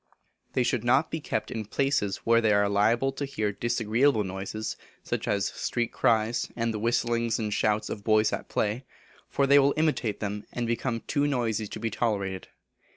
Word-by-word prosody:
They 130 Hz, -, +2 dB
should 120 Hz, -1 st, 0 dB
not 125 Hz, +6 st, +3 dB
be 160 Hz, -, -2 dB
kept -, -, -3 dB
in 110 Hz, -2 st, -3 dB
places 130 Hz, -2 st, 0 dB
where 115 Hz, 0 st, +4 dB
they 110 Hz, -2 st, +3 dB
are 100 Hz, 0 st, +3 dB
liable 110 Hz, +6 st, +2 dB
to 135 Hz, -, -5 dB
hear 110 Hz, -7 st, -1 dB
disagreeable 115 Hz, +3 st, +1 dB
noises, 95 Hz, +3 st, -4 dB, 0.3 s
such -, -, -3 dB
as 100 Hz, -1 st, +1 dB
street 120 Hz, -1 st, -2 dB
cries, 115 Hz, 0 st, +1 dB
and 115 Hz, -1 st, -1 dB
the 105 Hz, -, -3 dB
whistling 115 Hz, +1 st, 0 dB
and 105 Hz, -2 st, -2 dB
shouts 105 Hz, 0 st, +1 dB
of 105 Hz, -, -6 dB
boys 110 Hz, 0 st, +3 dB
at -, -, -4 dB
play, 110 Hz, +5 st, -1 dB, 0.5 s
for 140 Hz, -, +1 dB
they 140 Hz, +1 st, +6 dB
will 140 Hz, 0 st, +3 dB
imitate 150 Hz, -9 st, 0 dB
them, 105 Hz, 0 st, -4 dB
and 120 Hz, -, -2 dB
become 115 Hz, 0 st, -1 dB
too 145 Hz, -1 st, 0 dB
noisy 115 Hz, -6 st, -1 dB
to -, -, -7 dB
be 115 Hz, -, -2 dB
tolerated. 100 Hz, -5 st, -2 dB
115 Hz, 185 wpm, -27 LUFS, 105-125 Hz, 0.5 s, they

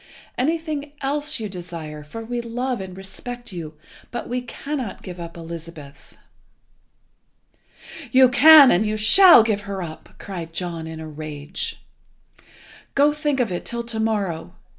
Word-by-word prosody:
Anything 300 Hz, +1 st, -2 dB
else 290 Hz, +1 st, -1 dB
you 220 Hz, -, -3 dB
desire, 170 Hz, -5 st, -7 dB
for 225 Hz, +10 st, -8 dB
we 240 Hz, +1 st, -3 dB
love 245 Hz, 0 st, -3 dB
and 185 Hz, -1 st, -8 dB
respect 240 Hz, +5 st, -8 dB
you, 160 Hz, -4 st, -7 dB, 0.3 s
but 240 Hz, -, -5 dB
we 250 Hz, +1 st, -2 dB
cannot 255 Hz, -2 st, -5 dB
give 180 Hz, -1 st, -8 dB
up 170 Hz, 0 st, -8 dB
Elizabeth." 165 Hz, -3 st, -10 dB, 1.9 s
"You 260 Hz, +1 st, +7 dB
can, 290 Hz, +2 st, +9 dB
and 180 Hz, -, +3 dB
you 215 Hz, 0 st, -1 dB
shall, 240 Hz, -, +8 dB
give 215 Hz, -2 st, 0 dB
her 195 Hz, -2 st, -3 dB
up!" 155 Hz, -2 st, -10 dB
cried 170 Hz, -4 st, -7 dB
John 170 Hz, -2 st, -4 dB
in 160 Hz, 0 st, -7 dB
a 160 Hz, -, -7 dB
rage. 150 Hz, -1 st, -6 dB, 1.1 s
"Go, 290 Hz, +1 st, +4 dB
think 295 Hz, -2 st, -1 dB
of 235 Hz, -6 st, +1 dB
it 175 Hz, -, -3 dB
till 235 Hz, 0 st, -4 dB
to 230 Hz, -1 st, -4 dB
morrow. 190 Hz, -6 st, -2 dB
215 Hz, 145 wpm, -22 LUFS, 170-255 Hz, 1.9 s, can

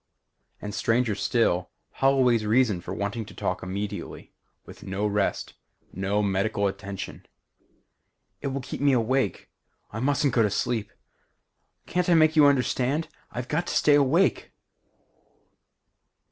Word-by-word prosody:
And 105 Hz, 0 st, -6 dB
stranger 115 Hz, +1 st, +1 dB
still, 100 Hz, -3 st, +1 dB, 0.2 s
Holloway's 130 Hz, -4 st, +3 dB
reason 110 Hz, -4 st, +2 dB
for -, -, -8 dB
wanting 100 Hz, +3 st, -3 dB
to -, -, -13 dB
talk -, -, -2 dB
immediately; 100 Hz, +2 st, -6 dB, 0.3 s
with -, -, -13 dB
no 95 Hz, +2 st, -3 dB
rest 105 Hz, -1 st, -1 dB, 0.4 s
no 100 Hz, +3 st, 0 dB
medical 100 Hz, +1 st, 0 dB
attention: 100 Hz, 0 st, -5 dB, 1.1 s
"It 140 Hz, -, -3 dB
will 135 Hz, -, -3 dB
help 135 Hz, -1 st, -4 dB
keep -, -, -6 dB
me 140 Hz, -1 st, +4 dB
awake. 125 Hz, -2 st, 0 dB, 0.4 s
I 110 Hz, -, -5 dB
mustn't 140 Hz, +1 st, +1 dB
go 120 Hz, -, +3 dB
to 105 Hz, -, +3 dB
sleep. 110 Hz, +1 st, -2 dB, 0.9 s
Can't 180 Hz, 0 st, -1 dB
I 170 Hz, -, +5 dB
make 155 Hz, 0 st, +4 dB
you 150 Hz, -2 st, +7 dB
understand? 140 Hz, +3 st, +1 dB, 0.2 s
_I've 125 Hz, 0 st, -5 dB
got 170 Hz, +5 st, -1 dB
to -, -, -3 dB
stay 150 Hz, -, +4 dB
awake. 145 Hz, +6 st, +2 dB
115 Hz, 135 wpm, -26 LUFS, 100-140 Hz, 1.1 s, you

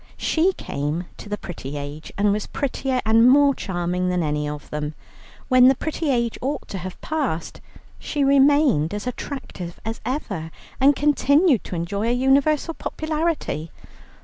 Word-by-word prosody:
She 350 Hz, +4 st, +2 dB
came 150 Hz, -, -3 dB
to 205 Hz, -, -10 dB
the 210 Hz, -, -2 dB
pretty 145 Hz, -7 st, -7 dB
age, 145 Hz, +2 st, -7 dB
and 205 Hz, 0 st, +3 dB
was 210 Hz, 0 st, -3 dB
prettier 265 Hz, -2 st, -2 dB
and 225 Hz, +2 st, +6 dB
more 280 Hz, +1 st, +6 dB
charming 180 Hz, -3 st, -2 dB
than 180 Hz, -1 st, 0 dB
any 150 Hz, -1 st, -1 dB
of 150 Hz, -1 st, -7 dB
them. 150 Hz, 0 st, -3 dB, 0.5 s
When 255 Hz, -1 st, +6 dB
the 265 Hz, -, +5 dB
pretty 315 Hz, +2 st, -3 dB
age 235 Hz, -3 st, 0 dB
ought 280 Hz, +3 st, -3 dB
to 195 Hz, -, -4 dB
have 185 Hz, +1 st, -7 dB
passed 280 Hz, -, -3 dB, 0.4 s
she 290 Hz, -2 st, -1 dB
remained 275 Hz, -, +4 dB
as 205 Hz, -, -5 dB
attractive 250 Hz, -9 st, -6 dB
as 225 Hz, +1 st, -4 dB
ever, 215 Hz, -, -3 dB, 0.3 s
and 275 Hz, +2 st, +5 dB
continued 290 Hz, -, +3 dB
to -, -, -5 dB
enjoy 200 Hz, +6 st, -2 dB
a 240 Hz, -, +2 dB
universal 275 Hz, +5 st, +2 dB
popularity. 310 Hz, -, -2 dB
235 Hz, 155 wpm, -23 LUFS, 175-280 Hz, 0.5 s, and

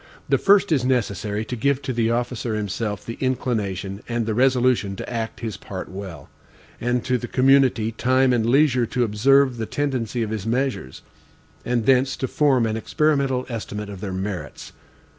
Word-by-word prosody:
The -, -, +3 dB
first 200 Hz, -1 st, +4 dB
is 140 Hz, -6 st, +2 dB
necessary 105 Hz, -4 st, -1 dB
to 125 Hz, -, -4 dB
give 140 Hz, +3 st, +1 dB
to 130 Hz, -, -2 dB
the 115 Hz, -1 st, +1 dB
officer 120 Hz, -1 st, -2 dB
himself 105 Hz, 0 st, -3 dB
the 115 Hz, -, -7 dB
inclination 105 Hz, -7 st, -2 dB
and 120 Hz, -1 st, -1 dB
the 110 Hz, -, -1 dB
resolution 125 Hz, -4 st, +2 dB
to -, -, -7 dB
act 115 Hz, -2 st, -4 dB
his 110 Hz, -3 st, -4 dB
part 95 Hz, -2 st, -7 dB
well, 95 Hz, -7 st, -8 dB, 0.5 s
and 120 Hz, 0 st, -1 dB
to 125 Hz, -1 st, +1 dB
the 120 Hz, -, -5 dB
community 130 Hz, -4 st, +3 dB
time 130 Hz, +3 st, +2 dB
and 120 Hz, -2 st, +2 dB
leisure 125 Hz, 0 st, +3 dB
to 125 Hz, -, 0 dB
observe 130 Hz, +4 st, +3 dB
the 110 Hz, -1 st, -3 dB
tendency 125 Hz, -5 st, -2 dB
of 110 Hz, -, -4 dB
his 110 Hz, -1 st, -4 dB
measures, 120 Hz, -, -2 dB, 0.6 s
and 120 Hz, -2 st, -1 dB
thence 130 Hz, +1 st, +3 dB
to 130 Hz, -, -2 dB
form 135 Hz, -5 st, +2 dB
an 110 Hz, 0 st, -1 dB
experimental 140 Hz, 0 st, 0 dB
estimate 105 Hz, -3 st, -5 dB
of 100 Hz, -2 st, -8 dB
their 100 Hz, -, -4 dB
merits. 95 Hz, -6 st, -5 dB
120 Hz, 175 wpm, -23 LUFS, 105-130 Hz, 0.6 s, first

